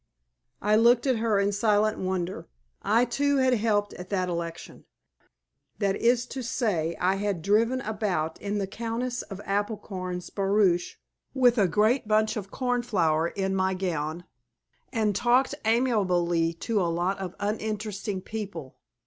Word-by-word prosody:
I 210 Hz, +1 st, +4 dB
looked 235 Hz, +2 st, +5 dB
at 260 Hz, -3 st, +2 dB
her 220 Hz, -2 st, +1 dB
in 200 Hz, +1 st, +2 dB
silent 210 Hz, +1 st, +2 dB
wonder. 185 Hz, -1 st, -3 dB, 0.3 s
I, 230 Hz, +3 st, +3 dB
too, 285 Hz, +4 st, +1 dB
had 260 Hz, -1 st, +3 dB
helped 210 Hz, -3 st, +1 dB
at 180 Hz, +1 st, -9 dB
that 185 Hz, -2 st, 0 dB
election 170 Hz, -1 st, -6 dB, 0.9 s
that 200 Hz, -2 st, +1 dB
is 240 Hz, +2 st, +2 dB
to 260 Hz, +1 st, -6 dB
say, 200 Hz, -10 st, -1 dB
I 190 Hz, +2 st, +2 dB
had 200 Hz, -5 st, -2 dB
driven 230 Hz, +6 st, +2 dB
about 200 Hz, -8 st, -2 dB
in 205 Hz, 0 st, -2 dB
the 200 Hz, -, 0 dB
Countess 235 Hz, +5 st, -3 dB
of 195 Hz, -2 st, -9 dB
Applecorn's 195 Hz, -3 st, -3 dB
barouche 195 Hz, -3 st, +1 dB, 0.4 s
with 245 Hz, -2 st, +4 dB
a 195 Hz, -, +4 dB
great 215 Hz, +7 st, +2 dB
bunch 215 Hz, 0 st, +2 dB
of 200 Hz, -3 st, -5 dB
cornflower 205 Hz, -11 st, +1 dB
in 190 Hz, +1 st, -2 dB
my 190 Hz, 0 st, +1 dB
gown, 170 Hz, -3 st, -3 dB, 0.7 s
and 215 Hz, -4 st, 0 dB
talked 245 Hz, +5 st, +3 dB
amiably 180 Hz, -8 st, +2 dB
to 210 Hz, +4 st, -1 dB
a 175 Hz, -, +1 dB
lot 175 Hz, +4 st, -1 dB
of 185 Hz, -2 st, -5 dB
uninteresting 210 Hz, -1 st, -3 dB
people. 190 Hz, -11 st, -7 dB
205 Hz, 145 wpm, -27 LUFS, 185-230 Hz, 0.9 s, looked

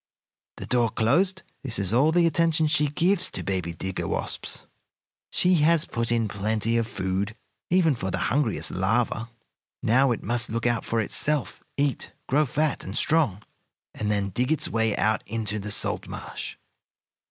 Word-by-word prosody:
The -, -, -6 dB
door 120 Hz, -2 st, +2 dB
closed, 180 Hz, -, +1 dB, 0.2 s
this 125 Hz, -5 st, +2 dB
is 100 Hz, 0 st, +3 dB
all 140 Hz, +6 st, +4 dB
the 175 Hz, +1 st, +3 dB
attention 165 Hz, -1 st, +2 dB
she 150 Hz, -1 st, +2 dB
gives 180 Hz, +6 st, +2 dB
to -, -, -6 dB
baby 90 Hz, -3 st, -2 dB
digger 95 Hz, +2 st, -4 dB
wasps. -, -, -2 dB, 0.7 s
She 180 Hz, +1 st, +3 dB
has 165 Hz, +1 st, +3 dB
put 115 Hz, 0 st, -3 dB
in 115 Hz, -2 st, +1 dB
plenty 110 Hz, +3 st, -1 dB
of 115 Hz, -1 st, 0 dB
food, 100 Hz, -1 st, -3 dB, 0.3 s
even 170 Hz, -4 st, +3 dB
for 95 Hz, -6 st, -4 dB
the -, -, -2 dB, 0.2 s
hungriest 135 Hz, -6 st, +1 dB
larva. 110 Hz, +4 st, 0 dB, 0.5 s
Now 130 Hz, +4 st, +3 dB
it 115 Hz, -, -3 dB
must 120 Hz, 0 st, 0 dB
look 115 Hz, +1 st, -3 dB
out 120 Hz, -1 st, +1 dB
for 115 Hz, 0 st, 0 dB
itself, 145 Hz, +6 st, 0 dB, 0.2 s
eat, 140 Hz, -1 st, -1 dB
grow 150 Hz, +3 st, +2 dB
fat 150 Hz, +3 st, 0 dB
and 95 Hz, -, -5 dB
strong, 145 Hz, -, +2 dB, 0.5 s
and 105 Hz, -, -3 dB
then 100 Hz, -1 st, 0 dB
dig 125 Hz, -, -1 dB
its 160 Hz, -, +2 dB
way 110 Hz, -2 st, 0 dB
out 110 Hz, 0 st, +2 dB
into 110 Hz, -1 st, -3 dB
the 105 Hz, +1 st, -6 dB
salt 100 Hz, -, +1 dB
marsh. -, -, -6 dB
115 Hz, 165 wpm, -25 LUFS, 105-150 Hz, 0.7 s, all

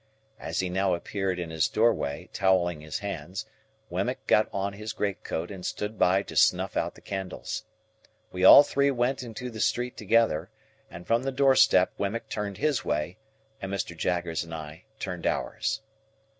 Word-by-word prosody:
As -, -, -2 dB
he 95 Hz, -, -1 dB
now 95 Hz, 0 st, +1 dB
appeared 95 Hz, +1 st, -2 dB
in 85 Hz, -2 st, -4 dB
his 80 Hz, -1 st, +2 dB
doorway, 110 Hz, -10 st, +1 dB
towelling 90 Hz, -4 st, +2 dB
his 75 Hz, 0 st, -4 dB
hands, 95 Hz, -2 st, -5 dB, 0.5 s
Wemmick -, -, -2 dB
got 105 Hz, -, +3 dB
on 100 Hz, 0 st, -2 dB
his 110 Hz, +2 st, -6 dB
great 100 Hz, -2 st, -2 dB
coat 85 Hz, +5 st, -4 dB
and 95 Hz, -2 st, -8 dB
stood 105 Hz, +4 st, -4 dB
by 95 Hz, +2 st, +4 dB
to -, -, -10 dB
snuff -, -, +3 dB
out -, -, -1 dB
the -, -, -16 dB
candles. 95 Hz, -2 st, -5 dB, 0.7 s
We 90 Hz, 0 st, -3 dB
all 140 Hz, -, +11 dB
three 140 Hz, -1 st, +1 dB
went 130 Hz, 0 st, 0 dB
into 125 Hz, +1 st, -6 dB
the 110 Hz, -, -8 dB
street 120 Hz, +3 st, 0 dB
together, 110 Hz, -5 st, +2 dB, 0.4 s
and 85 Hz, +1 st, -10 dB
from 115 Hz, +1 st, +2 dB
the 135 Hz, +1 st, -2 dB
door 135 Hz, 0 st, +4 dB
step 95 Hz, -6 st, +5 dB
Wemmick 105 Hz, +4 st, -2 dB
turned 100 Hz, -2 st, -4 dB
his 150 Hz, -1 st, 0 dB
way, 75 Hz, +6 st, -2 dB, 0.4 s
and 95 Hz, -, -4 dB
Mr. 95 Hz, -3 st, -3 dB
Jaggers 85 Hz, -1 st, -1 dB
and 85 Hz, 0 st, -7 dB
I 80 Hz, +3 st, -9 dB
turned 90 Hz, -4 st, -4 dB
ours. 110 Hz, 0 st, -1 dB
95 Hz, 175 wpm, -27 LUFS, 90-110 Hz, 0.7 s, all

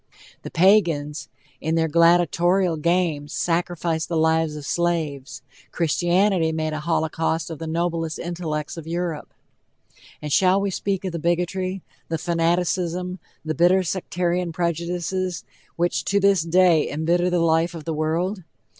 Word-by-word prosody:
The -, -, -7 dB
Pagans, 165 Hz, -6 st, +2 dB, 0.3 s
in 160 Hz, +1 st, -1 dB
their 165 Hz, 0 st, +2 dB
gladitorial 175 Hz, +2 st, +3 dB
games, 160 Hz, -2 st, 0 dB
sacrificed 170 Hz, -1 st, -1 dB
the 170 Hz, -, 0 dB
lives 160 Hz, -1 st, +2 dB
of 150 Hz, -2 st, -7 dB
slaves: 155 Hz, -7 st, -2 dB, 0.3 s
Christianity 175 Hz, +1 st, +2 dB
made 155 Hz, -1 st, -2 dB
a 155 Hz, -, -3 dB
holocaust 160 Hz, +1 st, -1 dB
of 160 Hz, -, -7 dB
the 165 Hz, -, -5 dB
noblest 165 Hz, 0 st, -2 dB
intellects 165 Hz, -3 st, -4 dB
of 165 Hz, -1 st, -8 dB
Europe. 170 Hz, -2 st, -3 dB, 0.9 s
And 150 Hz, -1 st, -4 dB
shall 190 Hz, +1 st, +4 dB
we 200 Hz, 0 st, -1 dB
speak 195 Hz, 0 st, -2 dB
of 185 Hz, -, -2 dB
the 170 Hz, -, -4 dB
bigotry, 180 Hz, +3 st, -1 dB, 0.3 s
the 165 Hz, -, -1 dB
fanaticism, 175 Hz, +2 st, -1 dB, 0.3 s
the 155 Hz, -, -1 dB
bitter 180 Hz, +3 st, +4 dB
sectarian 180 Hz, 0 st, -1 dB
prejudices 175 Hz, +2 st, -2 dB, 0.3 s
which 170 Hz, -3 st, 0 dB
to 200 Hz, -, +2 dB
this 200 Hz, -2 st, +4 dB
day 170 Hz, -1 st, +3 dB
embitter 170 Hz, +4 st, +1 dB
the 180 Hz, -, +1 dB
life 165 Hz, +1 st, +2 dB
of 160 Hz, -, -7 dB
the 160 Hz, -, -3 dB
world? 170 Hz, +5 st, -1 dB
170 Hz, 140 wpm, -23 LUFS, 160-180 Hz, 0.9 s, shall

